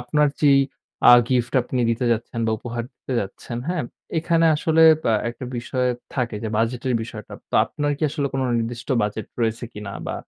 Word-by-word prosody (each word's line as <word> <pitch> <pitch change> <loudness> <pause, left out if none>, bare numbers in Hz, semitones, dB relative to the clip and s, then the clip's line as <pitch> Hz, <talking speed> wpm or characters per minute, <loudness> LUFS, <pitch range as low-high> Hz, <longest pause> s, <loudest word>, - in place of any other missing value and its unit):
আপনার 150 +5 +2
যেই 140 -2 +6 0.5
আ - - +10 0.2
গিফট 125 -2 +1
আপনি 125 0 -2
দিতে 115 +2 -1
যাচ্ছেন 115 +1 -3
বা 110 - +1
উপহার 120 0 -4
দিতে 130 - -7
যাচ্ছেন 100 +4 -6
হ্যাঁ, 175 -5 -1 0.4
এখানে 165 0 +2
আসলে 160 +1 +3 0.2
ব্য - - 0 0.2
একটা 120 +2 -9
বিষয় 125 +1 -1 0.3
থাকে 120 -4 -1
যে 110 - -2
বাজেটের 120 +2 0
বিষয়টা। 110 -3 -9 0.2
তো - - -6
আপনার 145 0 -2
কি - - -9
আসলে 145 -2 -1
কোনো 135 -1 0
নির্দিষ্ট 115 +1 -4
বাজেট 105 0 -3
রয়েছে 115 +1 0
কিনা 105 -1 -7
বা - - -3
120 Hz, 180 wpm, -23 LUFS, 115-140 Hz, 0.5 s, আ